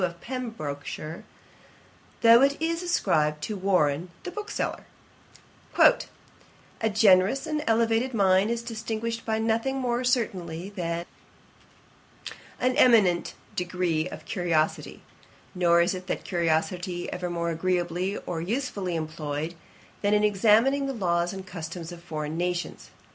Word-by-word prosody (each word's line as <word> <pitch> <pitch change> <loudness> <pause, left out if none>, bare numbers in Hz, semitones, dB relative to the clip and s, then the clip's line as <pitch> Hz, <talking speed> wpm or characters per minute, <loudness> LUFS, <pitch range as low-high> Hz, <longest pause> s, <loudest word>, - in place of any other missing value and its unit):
of 170 -1 -2
Pembrokeshire, 170 - -6 1.0
though 230 +1 +8
it 280 +1 +3
is 330 +1 -1
ascribed 150 - +1
to 215 - -3
Warren 180 -4 +1
the 360 - -5
bookseller: 420 +3 -4 0.9
'A 220 - 0
generous 205 +3 +4
and 305 -1 -2
elevated 230 +2 +2
mind 195 -2 +3
is 235 0 -2
distinguished 230 0 -4
by 220 -1 +1
nothing 230 +4 0
more 250 -1 -1
certainly 190 -8 -1
than 170 -3 -3 1.5
an 255 0 +1
eminent 210 - +4 0.2
degree 180 -2 -1
of - - -9
curiosity; 170 -5 -1 0.5
nor 170 -2 +4
is 175 - +2
that 185 0 -4
curiosity 175 +1 -1
ever 180 0 -3
more 170 -1 -2
agreeably 180 +2 -1
or 170 -2 -3
usefully 200 -3 -2
employed, 155 0 -4 0.5
than 205 0 +3
in 210 - +2
examining 225 +7 +3
the 270 - -2
laws 175 -6 0
and 190 -1 -7
customs 170 -1 -7
of 175 -1 -10
foreign 155 -2 -4
nations. 175 +1 -3
185 Hz, 120 wpm, -26 LUFS, 170-230 Hz, 1.5 s, though